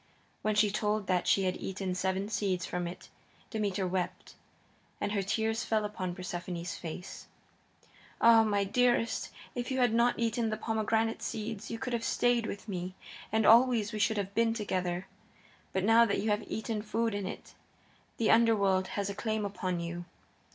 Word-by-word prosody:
When 215 Hz, 0 st, 0 dB
she 210 Hz, -1 st, +4 dB
told 210 Hz, 0 st, 0 dB
that 180 Hz, -1 st, +1 dB
she 195 Hz, -, +4 dB
had 185 Hz, -1 st, 0 dB
eaten 190 Hz, -1 st, -3 dB
seven 190 Hz, +2 st, -1 dB
seeds 190 Hz, -4 st, -1 dB
from 180 Hz, -1 st, -3 dB
it 175 Hz, -, -9 dB, 0.4 s
Demeter 205 Hz, -4 st, -1 dB
wept, 180 Hz, 0 st, -3 dB, 0.7 s
and -, -, -1 dB
her 205 Hz, -1 st, +1 dB
tears 220 Hz, +3 st, 0 dB
fell 215 Hz, -1 st, +1 dB
upon 185 Hz, -4 st, -4 dB
Persephone's 180 Hz, 0 st, -5 dB
face. 180 Hz, -1 st, -7 dB, 0.9 s
"Ah, 230 Hz, -1 st, +7 dB
my 205 Hz, -2 st, +1 dB
dearest," 240 Hz, +2 st, +2 dB
she -, -, -11 dB
cried, -, -, -11 dB
"if 240 Hz, -, -6 dB
you 260 Hz, -, -1 dB
had 245 Hz, -3 st, +3 dB
not 235 Hz, +1 st, +3 dB
eaten 230 Hz, 0 st, 0 dB
the 215 Hz, -, -2 dB
pomegranate 225 Hz, 0 st, 0 dB
seeds 215 Hz, -1 st, -4 dB
you 230 Hz, -, -3 dB
could 250 Hz, +1 st, -4 dB
have 230 Hz, -1 st, -1 dB
stayed 240 Hz, -1 st, +2 dB
with 200 Hz, -, -6 dB
me, 185 Hz, -2 st, -4 dB, 0.4 s
and 220 Hz, 0 st, +2 dB
always 230 Hz, -2 st, +5 dB
we 215 Hz, -, -3 dB
should 215 Hz, +2 st, +2 dB
have 200 Hz, -1 st, -2 dB
been 230 Hz, 0 st, +2 dB
together. 185 Hz, -4 st, -2 dB, 0.7 s
But 190 Hz, -, -1 dB
now 225 Hz, +3 st, +6 dB
that 205 Hz, -, 0 dB
you 215 Hz, +1 st, 0 dB
have 210 Hz, +1 st, -1 dB
eaten 220 Hz, -1 st, -2 dB
food 225 Hz, +1 st, -1 dB
in 200 Hz, -2 st, -2 dB
it, -, -, -8 dB, 0.6 s
the 225 Hz, -, +3 dB
Underworld 200 Hz, -5 st, +4 dB
has 200 Hz, -1 st, 0 dB
a 200 Hz, -, -3 dB
claim 215 Hz, 0 st, -2 dB
upon 185 Hz, -3 st, -2 dB
you. 170 Hz, +1 st, -5 dB
210 Hz, 180 wpm, -31 LUFS, 190-225 Hz, 0.9 s, Ah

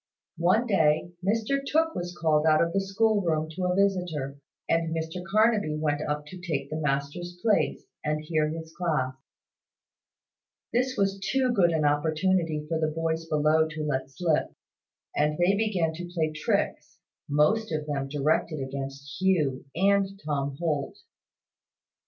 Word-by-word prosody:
One 185 Hz, +8 st, +3 dB
day, 165 Hz, -6 st, +2 dB
Mr 225 Hz, +7 st, +1 dB
Tooke 320 Hz, +3 st, +1 dB
was 175 Hz, 0 st, -5 dB
called 155 Hz, -1 st, +3 dB
out 155 Hz, 0 st, +5 dB
of 170 Hz, 0 st, +1 dB
the 195 Hz, -, +2 dB
school 205 Hz, +2 st, +2 dB
room 160 Hz, -3 st, 0 dB
to 180 Hz, +3 st, -3 dB
a 180 Hz, 0 st, +1 dB
visitor, 180 Hz, -8 st, 0 dB, 0.3 s
and 165 Hz, 0 st, +1 dB
Mr 160 Hz, +2 st, -4 dB
Carnaby 210 Hz, -4 st, +2 dB
went 150 Hz, -1 st, 0 dB
up 150 Hz, -1 st, -2 dB
to 185 Hz, +5 st, -10 dB
take 145 Hz, -6 st, -3 dB
the 155 Hz, +1 st, -2 dB
master's 150 Hz, +5 st, -2 dB
place, 215 Hz, +1 st, +1 dB, 0.2 s
and 150 Hz, 0 st, 0 dB
hear 155 Hz, -1 st, 0 dB
his 160 Hz, 0 st, -7 dB
class. 155 Hz, -7 st, 0 dB, 1.6 s
This 255 Hz, +2 st, +1 dB
was 195 Hz, 0 st, +1 dB
too 260 Hz, +5 st, +1 dB
good 190 Hz, -7 st, +4 dB
an 160 Hz, -2 st, +1 dB
opportunity 155 Hz, +2 st, +1 dB
for 160 Hz, 0 st, -1 dB
the 155 Hz, -, +1 dB
boys 160 Hz, +1 st, -2 dB
below 155 Hz, +1 st, +3 dB
to 155 Hz, 0 st, -5 dB
let 135 Hz, -3 st, -2 dB
slip; 160 Hz, +2 st, 0 dB, 0.7 s
and 150 Hz, +1 st, +1 dB
they 180 Hz, +3 st, +3 dB
began 195 Hz, -7 st, 0 dB
to 175 Hz, +2 st, -7 dB
play 160 Hz, -3 st, 0 dB
tricks, 155 Hz, 0 st, -1 dB, 0.3 s
most 160 Hz, +10 st, +2 dB
of 155 Hz, -1 st, -2 dB
them 140 Hz, -2 st, -2 dB
directed 150 Hz, +2 st, 0 dB
against 135 Hz, +3 st, -6 dB
Hugh 155 Hz, -10 st, +1 dB
and 195 Hz, +2 st, +2 dB
Tom 140 Hz, -2 st, -2 dB
Holt. 160 Hz, -, -2 dB
160 Hz, 150 wpm, -27 LUFS, 150-190 Hz, 1.6 s, out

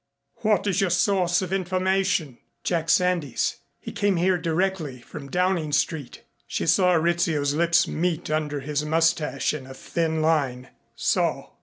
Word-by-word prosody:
"What 210 Hz, -2 st, +1 dB
is 195 Hz, -2 st, +1 dB
your 195 Hz, -, +2 dB
source 180 Hz, 0 st, +2 dB
of 185 Hz, 0 st, -4 dB
information?" 185 Hz, -6 st, 0 dB, 0.2 s
"Jack 165 Hz, -2 st, -1 dB
Sandys. 175 Hz, -7 st, +1 dB, 0.2 s
He -, -, -8 dB
came 200 Hz, -1 st, +1 dB
here 180 Hz, +2 st, +2 dB
directly 165 Hz, -5 st, -1 dB
from 140 Hz, +3 st, -10 dB
Downing 180 Hz, -2 st, 0 dB
Street." 150 Hz, -2 st, -1 dB, 0.2 s
She -, -, -2 dB
saw 180 Hz, +3 st, +4 dB
Rizzio's 160 Hz, -3 st, +1 dB
lips 170 Hz, +2 st, +3 dB
meet 170 Hz, -1 st, -2 dB
under 150 Hz, -2 st, -1 dB
his 150 Hz, +1 st, -2 dB
mustache 165 Hz, 0 st, +1 dB
in 140 Hz, -4 st, -7 dB
a 130 Hz, -, -10 dB
thin 160 Hz, +3 st, -2 dB
line. 140 Hz, -6 st, 0 dB, 0.3 s
"So. -, -, 0 dB
165 Hz, 145 wpm, -24 LUFS, 150-180 Hz, 0.3 s, saw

